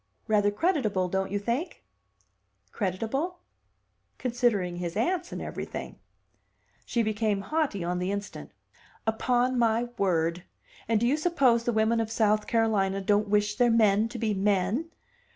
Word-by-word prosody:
"Rather 205 -1 +3
creditable, 215 - 0
don't 190 +1 -1
you 205 - -1
think?" 235 - -3 0.9
"Creditable?" 230 - -2 0.8
"Considering 230 -8 0
his 175 +1 -4
aunts 350 +9 0
and - - -5
everything." - - -6 0.9
She 235 - +1
became 215 -2 0
haughty 275 - -1
on 180 +1 -1
the 180 +2 -1
instant. 200 0 -5 0.6
"Upon 245 +3 +1
my 230 +1 +2
word! 170 -2 +1 0.5
And 225 -1 +2
do 235 - +1
you 270 +5 +2
suppose 275 -8 +2
the 240 - +2
women 220 +1 +2
of 225 -1 -1
South 215 -1 +1
Carolina 210 -4 +1
don't 205 +2 +1
wish 210 0 +1
their 245 -1 +4
men 220 -1 +3
to 240 - -7
be 220 -2 0
men? 200 - 0
220 Hz, 140 wpm, -27 LUFS, 200-240 Hz, 0.9 s, their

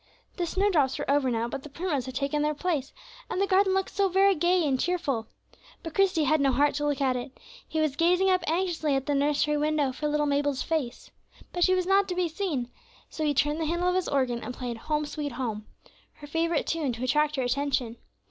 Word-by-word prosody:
The 350 -2 -1
snowdrops 345 -8 +1
were - - -2
over 280 -2 +2
now, 230 -1 -1
but 270 +3 -5
the 300 - -10
primroses 290 -4 -2
had 260 - -7
taken 280 +2 0
their 300 0 0
place, 300 -5 -2 0.4
and - - -2
the 395 - +3
garden 385 0 +3
looked 385 0 -1
very 390 0 +4
gay 350 0 +2
and 265 -2 +1
cheerful. 290 -11 -1 0.6
But 325 - -6
Christie 370 -5 +2
had 305 +1 +2
no 275 -1 +3
heart 285 +3 +2
to 295 0 -1
look 285 -1 -1
at 260 -2 +2
it; 250 +2 -6 0.3
he 315 - -2
was 310 -3 +1
gazing 355 +4 +3
up 370 -1 +3
anxiously 325 -4 0
at 270 0 -1
the 290 - 0
nursery 295 +1 +1
window 300 -2 +1
for 300 +4 -3
little 295 0 +1
Mabel's 285 -1 0
face. 305 -7 -3 0.4
But 355 - +1
she 370 +1 +4
was 365 -1 0
not 390 +1 +3
to 360 - -3
be 360 -1 +1
seen, 315 -8 -3 0.4
so 315 - -4
he 295 -1 +1
turned 295 +3 +1
the - - 0
handle 345 +3 +1
of - - +1
his 370 -1 0
organ 255 -4 0
and 250 - -6
played 245 -2 -5
"Home, 300 +5 -1
sweet 290 -1 -5
Home," 225 -4 -4 0.5
her 295 - -12
favorite 325 +1 0
tune, 305 -6 -1
to 235 +2 -6
attract 300 +4 +2
her 265 - -1
attention. 250 -2 -1
300 Hz, 225 wpm, -27 LUFS, 270-350 Hz, 0.6 s, very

